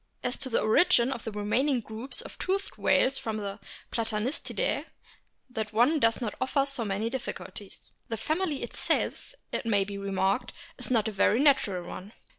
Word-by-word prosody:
As 250 +1 +1
to 260 - -1
the 230 - +2
origin 235 +1 +4
of 235 - -5
the 225 - -3
remaining 240 +7 +1
groups 225 +4 -6
of - - -11
toothed 390 +1 -1
whales 270 +1 +3
from 220 -1 -3
the 200 -1 -4 0.3
Platanistidae, 230 - -1 0.7
that 220 -2 -3 0.3
does 230 -3 +4
not 230 -4 -2
offer 275 +1 +2
so 275 -4 -2
many 205 +1 -1
difficulties. 230 -4 -6 0.2
The 225 - -2
family 315 - -1
itself, - - -1 0.2
it 230 - -2
may 205 -3 +4
be 200 0 -6
re 200 0 -4
marked, 195 +6 +1 0.3
is - - -6
not 230 -4 +3
a - - -1
very 210 +3 +3
natural 215 - +3
one. 200 +4 -8
230 Hz, 170 wpm, -29 LUFS, 210-265 Hz, 0.7 s, origin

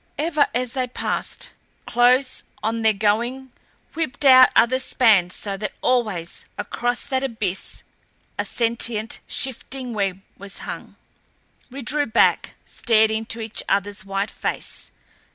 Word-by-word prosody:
Ever, 305 -1 +2
as 250 -1 0
they 255 -2 -1
passed, 250 - -3 0.3
close 250 +2 +3 0.2
on 225 +1 -1
their 220 0 +5
going 235 +6 0 0.4
whipped 295 -3 -3
out 255 -1 +9
other 260 +2 +4
spans 215 -9 +3
so 200 -2 -3
that 210 +1 -4
always 215 -10 0
across 245 +1 -1
that 265 -1 -1
abyss 220 -7 -2 0.5
a - - -1
sentient, 230 -1 -1
shifting 260 -1 -2
web 195 -3 -1 0.2
was 200 0 -5
hung. - - -7 0.7
We 270 +1 -8
drew 290 +4 0
back, 225 +1 +2
stared 220 -2 +3
into 225 +1 -3
each 220 -1 -2
other's 200 +1 0
white 195 +1 -2
face. - - -4
235 Hz, 130 wpm, -22 LUFS, 210-255 Hz, 0.7 s, out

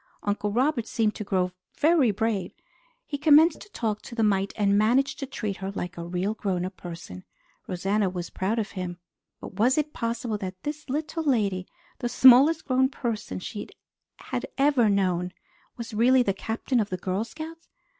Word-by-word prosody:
Uncle 205 0 -1
Robert 250 0 +1
seemed 220 -2 +1
to 215 - -5
grow 185 -2 0 0.3
very 310 -5 +4
brave. 210 -3 -1 0.5
He 285 - -4
commenced 305 +2 +5
to - - -12
talk 220 - -2
to 235 - -10
the 225 - +1
mite 195 -2 +2
and 200 -2 +2
managed 240 +7 +2
to 275 - -4
treat 210 -6 -4
her 190 0 -4
like 185 -2 -5
a 170 - -6
really 180 +4 -1
grown 190 -5 -2
up 185 +1 -6
person. 165 - -9 0.4
Rosanna 195 +2 0
was 180 -1 -5
proud 200 +5 -1
of 215 -2 -2
him. 180 -2 -5 0.4
But 190 - -10
was 250 +6 +4
it 300 0 0
possible 230 -2 -2
that 185 -2 -6
this 300 0 -5
little 310 +4 -2
lady, 205 -10 +1 0.3
the 240 - -2
smallest 265 +7 +7
grown 260 0 +3
person 235 -5 -4
she 205 +3 -6 0.5
had - - -4
ever 275 -5 +4
known, 180 -2 +1 0.4
was 230 -2 -7
really 250 +4 +4
the 195 - +1
Captain 225 +5 -1
of 210 -2 0
the 185 - -3
Girl 185 +3 -2
Scouts? 320 +7 -9
215 Hz, 180 wpm, -26 LUFS, 190-260 Hz, 0.5 s, smallest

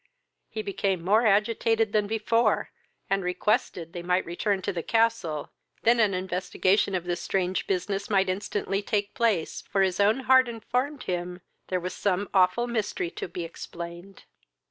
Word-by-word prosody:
He 435 - -4
became 195 - -1
more 220 +4 +4
agitated 220 +1 +2
than 210 -1 +2
before, 225 +1 +1 0.4
and 195 0 0
requested 180 -2 -1
they 175 - -5
might 180 +1 +1
return 190 +3 -1
to - - -1
the 170 - -2
castle, 225 -8 0 0.3
than 235 +1 +4
an 205 -4 +3
investigation 185 +2 +1
of 180 - -1
this 175 0 -3
strange 185 -1 -1
business 195 +2 -2
might 195 -2 +3
instantly 195 +1 -2
take 205 0 -1
place, 220 -9 0
for 195 -1 0
his 185 0 0
own 215 +6 +3
heart 260 -1 +5
informed 250 +5 -2
him 180 0 -4 0.3
there 185 - 0
was 180 +1 -4
some 200 0 -1
awful 190 +5 +4
mystery 215 -7 -2
to - - -5
be 175 0 -5
explained. 170 +3 -8
195 Hz, 160 wpm, -27 LUFS, 180-220 Hz, 0.4 s, heart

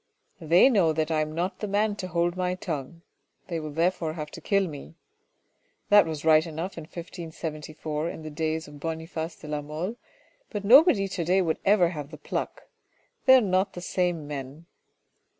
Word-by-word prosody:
They 170 +6 +5
know 190 -11 +3
that 155 +1 -1
I 155 -1 +2
am 155 0 -3
not 180 +2 -2
the 210 - -3
man 205 +1 +1
to 185 - -4
hold 170 0 0
my 180 0 -1
tongue. 165 -2 -5 0.5
They 170 -2 -2
will 155 -1 -5
therefore 165 +1 0
have 150 -2 -6
to 170 - -9
kill 195 +2 +1
me. 150 0 -9 0.9
That 205 -3 +7
was 155 -1 -5
right 155 -1 +6
enough 165 +3 -5
in 165 - -7
1574 160 -2 -5
in 160 - -8
the 155 - -7
days 160 +1 -2
of 150 0 -12
Boniface 160 +1 -4
de 155 - -12
la 150 0 -2
Mole, 160 +10 -5 0.5
but 205 -2 -5
nobody 245 - +7
to 185 -2 -3
day 180 +4 +3
would 160 -2 -1
ever 195 -4 +5
have 150 -5 -6
the 155 - -10
pluck. - - -4 0.6
They 260 - +10
are 260 - +6
not 190 -1 +1
the 175 - -7
same 175 -3 -1
men. 145 +2 -7
165 Hz, 185 wpm, -27 LUFS, 155-185 Hz, 0.9 s, They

